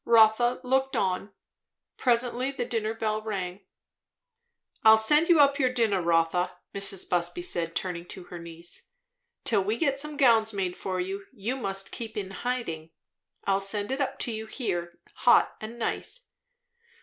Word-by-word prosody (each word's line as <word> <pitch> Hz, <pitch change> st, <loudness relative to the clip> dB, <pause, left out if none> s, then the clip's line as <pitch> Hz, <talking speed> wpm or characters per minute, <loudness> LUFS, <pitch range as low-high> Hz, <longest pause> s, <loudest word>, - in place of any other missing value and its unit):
Rotha 230 Hz, +2 st, +5 dB
looked 265 Hz, +1 st, +1 dB
on. 190 Hz, +2 st, -1 dB, 0.6 s
Presently 245 Hz, +1 st, +1 dB
the 265 Hz, -3 st, -3 dB
dinner 225 Hz, -1 st, -2 dB
bell 215 Hz, -1 st, -1 dB
rang. 195 Hz, -3 st, -4 dB, 1.2 s
"I'll 220 Hz, 0 st, +9 dB
send 295 Hz, +10 st, +4 dB
you 335 Hz, -3 st, +6 dB
up 280 Hz, 0 st, +5 dB
your 255 Hz, -2 st, +3 dB
dinner, 225 Hz, -6 st, +1 dB
Rotha," 165 Hz, +1 st, +1 dB, 0.2 s
Mrs. 195 Hz, -1 st, 0 dB
Busby 175 Hz, -, 0 dB
said, 170 Hz, -, -2 dB
turning 175 Hz, -2 st, -3 dB
to 185 Hz, -, -9 dB
her 175 Hz, 0 st, -9 dB
niece. 170 Hz, +1 st, -9 dB, 0.6 s
"Till 205 Hz, -4 st, +2 dB
we 215 Hz, +4 st, -1 dB
get 275 Hz, -4 st, +1 dB
some 300 Hz, 0 st, -3 dB
gowns 225 Hz, -5 st, +4 dB
made 185 Hz, -3 st, -2 dB
for 185 Hz, -1 st, -3 dB
you, 195 Hz, +2 st, -4 dB
you 235 Hz, +1 st, -3 dB
must 195 Hz, -6 st, -1 dB
keep 225 Hz, -2 st, -7 dB
in 195 Hz, -2 st, -4 dB
hiding. 195 Hz, -8 st, -3 dB, 0.5 s
I'll 195 Hz, 0 st, +1 dB
send 205 Hz, +3 st, -2 dB
it 270 Hz, +2 st, -1 dB
up 270 Hz, -1 st, -1 dB
to 240 Hz, -, +1 dB
you 220 Hz, 0 st, -5 dB
here, 175 Hz, -8 st, -3 dB, 0.2 s
hot -, -, +4 dB
and 220 Hz, +2 st, -7 dB
nice." -, -, -3 dB
215 Hz, 160 wpm, -27 LUFS, 185-250 Hz, 1.2 s, I'll